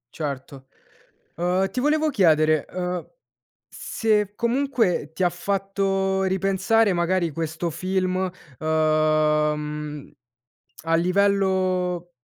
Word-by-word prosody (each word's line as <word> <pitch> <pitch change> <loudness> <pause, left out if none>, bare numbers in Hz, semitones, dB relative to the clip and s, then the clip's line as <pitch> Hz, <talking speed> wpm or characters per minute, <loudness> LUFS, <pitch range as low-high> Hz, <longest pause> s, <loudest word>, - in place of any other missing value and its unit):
Certo. 140 -3 -6 0.7
Uhm, 180 +3 +1
ti 250 - -1
volevo 305 +2 +2
chiedere, 155 - +3
uhm, 180 -1 -3 0.7
se 210 -3 -1
comunque 235 - 0
ti 185 - -2
ha 175 - +4
fatto 195 +1 -1
ripensare 195 +3 +2
magari, 175 -1 0
questo 165 +2 -3
film, 185 +2 -1 0.3
uhm, 150 -1 0 0.7
a 165 0 +1
livello 185 -1 +1
180 Hz, 90 wpm, -23 LUFS, 155-195 Hz, 0.7 s, ha